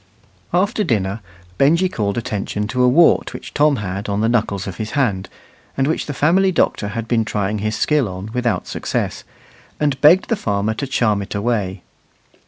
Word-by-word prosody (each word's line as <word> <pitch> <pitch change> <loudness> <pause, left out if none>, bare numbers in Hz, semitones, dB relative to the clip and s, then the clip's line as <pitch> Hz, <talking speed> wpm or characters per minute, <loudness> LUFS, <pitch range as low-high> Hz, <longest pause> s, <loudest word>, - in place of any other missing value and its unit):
After 200 +4 +1
dinner 100 - -1 0.4
Benjy 165 +7 +4
called 105 - -2
attention 105 -2 -3
to 125 +2 0
a 125 - +5
wart 160 +7 +4
which - - -9
Tom 150 0 +3
had 100 -1 -4
on 100 0 -1
the 110 - +2
knuckles 110 -4 0
of 95 -3 -6
his 110 0 -5
hand, 105 -9 0 0.5
and 135 - +2
which 155 - -1
the 145 - -3
family 185 +7 +3
doctor 110 - +1
had 115 +2 -4
been 115 -1 +2
trying 105 -1 -2
his 110 +1 -2
skill 150 -6 +1
on 95 +3 -7
without 125 -2 -1
success, - - -3 0.6
and 145 -2 0
begged 165 +6 +5
the 230 - +2
farmer 105 - -1
to 140 +5 -4
charm 110 -6 +1
it 100 - -6
away. 100 -4 -1
115 Hz, 185 wpm, -19 LUFS, 100-145 Hz, 0.6 s, a